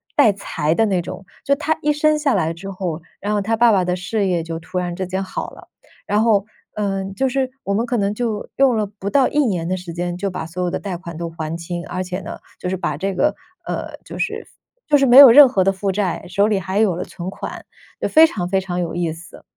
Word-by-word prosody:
带 215 Hz, -, +6 dB
财 160 Hz, -5 st, -2 dB
的 225 Hz, -, +3 dB
那 190 Hz, -4 st, +1 dB
种， 185 Hz, +2 st, -8 dB, 0.2 s
就 280 Hz, -, +2 dB
她 310 Hz, +2 st, -1 dB
一 300 Hz, -, +2 dB
生 305 Hz, +1 st, +2 dB
下 285 Hz, -5 st, +1 dB
来 165 Hz, -4 st, 0 dB
之 190 Hz, +4 st, -8 dB
后， 180 Hz, -4 st, -4 dB, 0.2 s
然 205 Hz, +2 st, -1 dB
后 205 Hz, -, +1 dB
她 220 Hz, +3 st, 0 dB
爸 235 Hz, 0 st, +5 dB
爸 195 Hz, -3 st, +3 dB
的 180 Hz, 0 st, 0 dB
事 200 Hz, +3 st, -1 dB
业 175 Hz, -3 st, 0 dB
就 165 Hz, 0 st, -5 dB
突 180 Hz, +3 st, -7 dB
然 175 Hz, -1 st, -3 dB
之 185 Hz, 0 st, -4 dB
间 190 Hz, +1 st, -2 dB
好 190 Hz, -, -5 dB
了， -, -, -15 dB, 0.4 s
然 210 Hz, +1 st, +2 dB
后， 210 Hz, -4 st, +3 dB, 0.3 s
呃， 195 Hz, -2 st, -1 dB
就 265 Hz, +3 st, +1 dB
是 260 Hz, 0 st, -1 dB
我 200 Hz, -, -3 dB
们 225 Hz, +4 st, +1 dB
可 245 Hz, 0 st, -1 dB
能 200 Hz, -1 st, 0 dB
就 225 Hz, -2 st, -3 dB
用 265 Hz, -3 st, +4 dB
了 215 Hz, -1 st, 0 dB
不 200 Hz, -1 st, -6 dB
到 275 Hz, -2 st, +4 dB
1 295 Hz, -, -1 dB
年 180 Hz, -7 st, -1 dB
的 185 Hz, +1 st, -1 dB
时 175 Hz, -2 st, -8 dB
间 175 Hz, 0 st, -3 dB
就 195 Hz, +2 st, -2 dB
把 180 Hz, -, -4 dB
所 175 Hz, +2 st, -4 dB
有 175 Hz, -, -1 dB
的 -, -, -2 dB
贷 190 Hz, -4 st, -5 dB
款 170 Hz, -1 st, -9 dB
都 170 Hz, 0 st, -4 dB
还 160 Hz, -1 st, -5 dB
清。 170 Hz, +1 st, -5 dB
而 185 Hz, +1 st, -3 dB
且 180 Hz, 0 st, -4 dB
呢， -, -, -7 dB, 0.2 s
就 -, -, -4 dB
是 190 Hz, -, -1 dB
把 150 Hz, -5 st, -2 dB
这 195 Hz, +4 st, -2 dB
个， 295 Hz, +11 st, +1 dB, 0.3 s
呃， -, -, -4 dB
就 -, -, -8 dB
是 -, -, -3 dB, 0.4 s
就 295 Hz, -, +5 dB
是 275 Hz, -, +3 dB
没 250 Hz, 0 st, +6 dB
有 280 Hz, -2 st, +12 dB
任 285 Hz, +2 st, +10 dB
何 195 Hz, -6 st, +2 dB
的 195 Hz, -, +3 dB
负 195 Hz, +1 st, -2 dB
债， 190 Hz, -3 st, -2 dB
手 200 Hz, +3 st, +2 dB
里 210 Hz, -3 st, +1 dB
还 190 Hz, +2 st, -2 dB
有 210 Hz, -5 st, +3 dB
了 180 Hz, -, -3 dB
存 175 Hz, +1 st, -7 dB
款， -, -, -7 dB, 0.4 s
就 -, -, +1 dB
非 320 Hz, +1 st, +7 dB
常 180 Hz, -, -4 dB
非 195 Hz, 0 st, +2 dB
常 180 Hz, -2 st, -4 dB
有 170 Hz, -2 st, -3 dB
意 175 Hz, -2 st, -1 dB
思。 165 Hz, 0 st, -13 dB
190 Hz, 280 characters per minute, -20 LUFS, 175-220 Hz, 0.4 s, 有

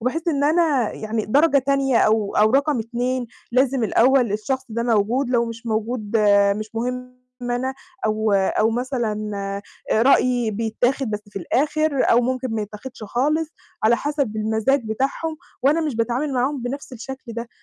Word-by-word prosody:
وباحس 320 Hz, +9 st, -1 dB
إن 285 Hz, -3 st, +1 dB
أنا 300 Hz, -7 st, +2 dB
يعني 215 Hz, 0 st, -3 dB
درجة 285 Hz, +5 st, +4 dB
تانية 270 Hz, -1 st, +1 dB
أو 215 Hz, -2 st, +2 dB
أو 215 Hz, +1 st, +5 dB
رقم 280 Hz, +1 st, +2 dB
2، 245 Hz, +2 st, -2 dB, 0.3 s
لازم 260 Hz, -1 st, +2 dB
الأول 245 Hz, +1 st, +3 dB
الشخص 260 Hz, +6 st, -2 dB
ده 235 Hz, +1 st, -2 dB
موجود، 235 Hz, +3 st, +1 dB
لو 235 Hz, -2 st, +3 dB
مش 230 Hz, +1 st, -8 dB
موجود 220 Hz, 0 st, -1 dB, 0.4 s
مش 215 Hz, +1 st, -7 dB
مهم 250 Hz, +2 st, -4 dB, 0.2 s
أنا، 245 Hz, +2 st, -2 dB, 0.3 s
أو 215 Hz, 0 st, +1 dB
أو 200 Hz, +3 st, +2 dB
مثلًا 225 Hz, -4 st, -2 dB, 0.6 s
آآ، 220 Hz, -, +3 dB
رأيي 250 Hz, -3 st, +3 dB
بيتاخد 230 Hz, +4 st, -1 dB
بس 210 Hz, -1 st, -2 dB
في 200 Hz, -, -5 dB
الآخر، 290 Hz, -, +1 dB
أو 235 Hz, -, +6 dB
ممكن 255 Hz, +1 st, -1 dB
ما 215 Hz, -, -1 dB
يتاخدش 215 Hz, +4 st, -9 dB
خالص 300 Hz, +8 st, 0 dB, 0.3 s
على 225 Hz, +2 st, +4 dB
حسب 280 Hz, -7 st, -2 dB
المزاج 220 Hz, +5 st, +1 dB
بتاعهم، 270 Hz, +8 st, -2 dB, 0.3 s
وأنا 290 Hz, +5 st, +3 dB
مش 300 Hz, -7 st, -2 dB
باتعامل 245 Hz, +5 st, -1 dB
معاهم 260 Hz, +1 st, 0 dB
بنفْس 265 Hz, +3 st, -5 dB
الشكل 255 Hz, 0 st, -8 dB
ده، 235 Hz, +1 st, -5 dB
245 Hz, 155 wpm, -22 LUFS, 220-270 Hz, 0.6 s, أو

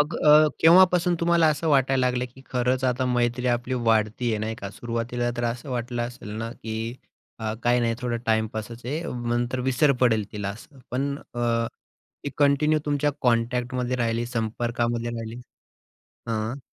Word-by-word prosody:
मग 150 Hz, +1 st, +1 dB
अ, 150 Hz, +1 st, +7 dB
केव्हापासून 180 Hz, +1 st, +6 dB
तुम्हाला 170 Hz, -1 st, +4 dB
असं 155 Hz, +1 st, 0 dB
वाटायला 135 Hz, -2 st, +3 dB
लागलं 125 Hz, 0 st, 0 dB
की 130 Hz, -, -15 dB
खरंच 125 Hz, +1 st, 0 dB
आता 130 Hz, 0 st, +1 dB
मैत्री 120 Hz, 0 st, 0 dB
आपली 125 Hz, +1 st, 0 dB
वाढती 115 Hz, 0 st, +1 dB
आहे, 110 Hz, -, 0 dB
नाही 110 Hz, +1 st, -3 dB
का. 100 Hz, -2 st, -7 dB
सुरुवातीला 120 Hz, +2 st, -3 dB
तर 120 Hz, -, -1 dB
असं 120 Hz, +3 st, -3 dB
वाटलं 120 Hz, -1 st, -2 dB
असेल 120 Hz, -2 st, -7 dB
ना 115 Hz, +1 st, -4 dB
की 115 Hz, +1 st, -5 dB, 0.5 s
अ, 110 Hz, -1 st, -2 dB
काही 120 Hz, 0 st, +3 dB
नाही 115 Hz, -1 st, +1 dB
थोडं 120 Hz, -2 st, -1 dB
टाइमपासच 110 Hz, +1 st, -2 dB
आहे 150 Hz, +6 st, -2 dB, 0.3 s
नंतर 120 Hz, +2 st, 0 dB
विसर 140 Hz, +3 st, +4 dB
पडेल 110 Hz, -4 st, +3 dB
तिला 105 Hz, -2 st, -3 dB
असं. 120 Hz, +7 st, -12 dB
पण 140 Hz, +3 st, -1 dB, 0.2 s
अ, 115 Hz, -1 st, +1 dB, 0.6 s
ती 145 Hz, -, -2 dB
कंटिन्यू 145 Hz, +2 st, +3 dB
तुमच्या 145 Hz, 0 st, +1 dB
कॉन्टॅक्टमध्ये 125 Hz, +1 st, 0 dB
राहिली, 115 Hz, 0 st, 0 dB
संपर्कामध्ये 120 Hz, 0 st, -2 dB
राहिली. 115 Hz, +1 st, -6 dB, 0.9 s
हां. 115 Hz, +4 st, -2 dB
120 Hz, 160 wpm, -25 LUFS, 115-130 Hz, 0.9 s, अ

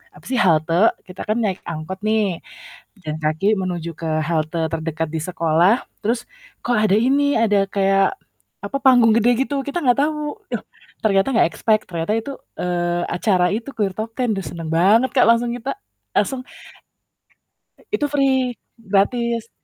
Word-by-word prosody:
apa -, -, -17 dB
sih 255 Hz, -2 st, 0 dB
halte 170 Hz, +3 st, +3 dB
kita 185 Hz, -, -9 dB
kan 215 Hz, -, +1 dB
naik 195 Hz, -4 st, -2 dB
angkot 165 Hz, +4 st, -5 dB
nih, 215 Hz, -5 st, +1 dB, 0.6 s
jalan 155 Hz, -2 st, -4 dB
kaki 155 Hz, +5 st, 0 dB
menuju 175 Hz, -3 st, -3 dB
ke 165 Hz, -, -5 dB, 0.2 s
halte 160 Hz, 0 st, -1 dB
terdekat 160 Hz, 0 st, -2 dB
di 160 Hz, -, -3 dB
sekolah, 170 Hz, +4 st, +2 dB, 0.2 s
terus 235 Hz, +3 st, -1 dB, 0.4 s
kok 245 Hz, -, +1 dB
ada 210 Hz, -2 st, +3 dB
ini 280 Hz, +3 st, +2 dB
ada 205 Hz, -3 st, +3 dB
kayak 195 Hz, -, +2 dB, 0.5 s
apa -, -, -3 dB
panggung 245 Hz, -4 st, +6 dB
gede 230 Hz, +1 st, +4 dB, 0.2 s
gitu, 280 Hz, -2 st, -2 dB
kita 285 Hz, +5 st, -3 dB
nggak 245 Hz, 0 st, +3 dB
tahu, 300 Hz, 0 st, -2 dB, 0.2 s
yoh, -, -, -2 dB, 0.4 s
ternyata 195 Hz, +1 st, +3 dB
nggak 230 Hz, -, +5 dB
expect 215 Hz, -1 st, +1 dB
ternyata 170 Hz, +3 st, -2 dB
itu, 250 Hz, +5 st, -5 dB, 0.3 s
eee, 175 Hz, -1 st, -1 dB
acara 180 Hz, 0 st, +1 dB
itu 230 Hz, +5 st, -4 dB
Clear 200 Hz, -4 st, -1 dB
Top 220 Hz, +1 st, -4 dB
10, 245 Hz, -4 st, +1 dB
duh 195 Hz, -, -3 dB
seneng 165 Hz, -2 st, -7 dB
banget 210 Hz, +9 st, +4 dB
Kak 255 Hz, -, +5 dB
langsung 235 Hz, +1 st, +2 dB
kita, 255 Hz, -, -5 dB, 0.4 s
langsung 265 Hz, -2 st, +1 dB, 1.5 s
Itu 295 Hz, -8 st, +1 dB
free, 265 Hz, -3 st, +2 dB, 0.2 s
gratis. 230 Hz, +3 st, 0 dB
210 Hz, 155 wpm, -21 LUFS, 175-245 Hz, 1.5 s, panggung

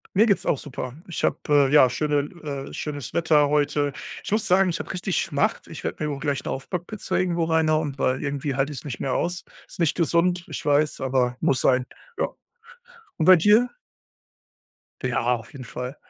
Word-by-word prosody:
Mir 215 Hz, -, +6 dB
geht's 200 Hz, -6 st, +1 dB
auch 145 Hz, -, +2 dB
super. 130 Hz, -3 st, -6 dB
Ich 175 Hz, -, -5 dB
habe, -, -, +2 dB
äh 145 Hz, -2 st, +4 dB
ja, 145 Hz, -3 st, +7 dB
schöne 150 Hz, +4 st, -1 dB
l 145 Hz, -2 st, -6 dB
äh, -, -, -12 dB
schönes 145 Hz, -4 st, -5 dB
Wetter 150 Hz, -3 st, +3 dB
heute. 145 Hz, -1 st, +1 dB, 0.3 s
Ich -, -, -6 dB
muss 215 Hz, 0 st, +1 dB
sagen, 190 Hz, 0 st, +4 dB
ich 165 Hz, -, -4 dB
habe -, -, -5 dB
richtig 185 Hz, 0 st, -2 dB
Schmacht. 145 Hz, -3 st, -1 dB
Ich -, -, -9 dB
werde -, -, -4 dB
wohl 150 Hz, -, -1 dB
mir 145 Hz, -, -2 dB
auch -, -, -8 dB
gleich 140 Hz, -1 st, -2 dB
'ne -, -, -4 dB
Aufbackpizza 175 Hz, +9 st, -4 dB
irgendwo 175 Hz, -2 st, +1 dB
reinhauen, 155 Hz, -2 st, +1 dB
weil 130 Hz, -1 st, +1 dB
irgendwie 140 Hz, -1 st, -2 dB
halte 135 Hz, +2 st, 0 dB
ich 135 Hz, -, -5 dB
es -, -, -15 dB
nicht 130 Hz, -5 st, -5 dB
mehr 135 Hz, -, -1 dB
aus. 175 Hz, +4 st, -1 dB, 0.2 s
Ist -, -, -13 dB
nicht 165 Hz, -3 st, +2 dB
gesund. 170 Hz, +1 st, +1 dB
Ich -, -, -6 dB
weiß, 150 Hz, +1 st, +2 dB
aber 125 Hz, -2 st, 0 dB
muss 130 Hz, -, +2 dB
sein. 125 Hz, -1 st, +3 dB, 0.3 s
Ja. -, -, +2 dB, 0.9 s
Und -, -, 0 dB
bei 185 Hz, 0 st, +9 dB
dir? 210 Hz, +8 st, +4 dB, 1.3 s
Ja, 130 Hz, +1 st, 0 dB
auf 115 Hz, -2 st, -11 dB
jeden 135 Hz, -, -8 dB
Fall. 125 Hz, +2 st, -6 dB
150 Hz, 205 wpm, -24 LUFS, 135-170 Hz, 1.3 s, bei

